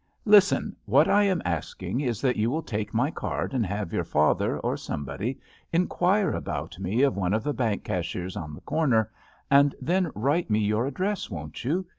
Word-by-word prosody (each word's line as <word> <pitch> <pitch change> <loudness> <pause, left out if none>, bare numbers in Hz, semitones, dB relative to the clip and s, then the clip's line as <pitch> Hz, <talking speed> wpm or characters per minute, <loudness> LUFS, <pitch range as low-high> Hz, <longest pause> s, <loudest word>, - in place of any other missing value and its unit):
Listen; 205 -2 +5
what - - +4
I 205 0 +4
am 185 -4 +1
asking 90 - -3
is 120 -6 -2
that 130 -2 +2
you 110 +2 +1
will 160 +5 -2
take 105 -6 -3
my 125 +7 +1
card - - -3
and 125 -3 +1
have 100 -2 -4
your - - 0
father, 75 +1 +1
or - - -1
somebody, 100 - -4 0.3
inquire 180 +3 +2
about - - -4
me 100 +7 +1
of 140 - +3
one 95 0 0
of 110 - -1
the 145 - -1
bank 115 -6 -1
cashiers 90 +1 -3
on 75 -3 -6
the - - -13
corner, 125 -10 +1 0.4
and 140 0 +6
JUST - - -21
SWEETHEARTS - - -7
J^ - - -9 0.2
then 165 - -3
write 145 +8 +1
me 105 - +3
your 110 +3 +1
address, 185 +9 -2
won't 75 -3 -7
you 170 +9 0
120 Hz, 205 wpm, -26 LUFS, 100-160 Hz, 0.4 s, and